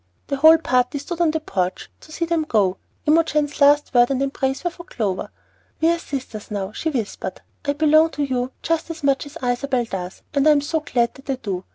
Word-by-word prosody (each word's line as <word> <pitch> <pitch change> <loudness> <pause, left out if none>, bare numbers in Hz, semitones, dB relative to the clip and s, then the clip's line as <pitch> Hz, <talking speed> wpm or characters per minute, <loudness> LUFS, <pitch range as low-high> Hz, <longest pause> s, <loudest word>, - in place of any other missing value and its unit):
The 280 - -1
whole 315 +3 +8
party 255 -3 +1
stood 340 +4 -4
on 335 - +4
the 320 +1 0
porch 185 - -2
to 310 - -16
see 335 +2 -2
them 335 -1 +1
go. 200 -9 +1 0.3
Imogen's 300 -2 +2
last 290 0 +5
word 245 -1 +5
and 270 -2 0
embrace 270 +1 -1
were 350 - 0
for 345 - -11
Clover. 210 - -3 0.5
"We 325 - +3
are 340 - 0
sisters 260 -9 -6
now," 200 -2 -3
she 320 - -2
whispered. 240 -9 -4 0.2
"I 285 - +1
belong 310 +2 +4
to 295 - +1
you 255 -2 -1
just 330 0 -1
as 325 -2 -7
much 275 +1 +1
as 295 +3 -10
Isabel 245 0 0
does, 185 -4 -6
and 280 0 +3
I - - +8
am 285 - +2
so 320 +3 -1
glad 245 -6 0
that 270 0 -16
I 270 - +1
do! 195 -7 -5
280 Hz, 220 wpm, -22 LUFS, 245-315 Hz, 0.5 s, whole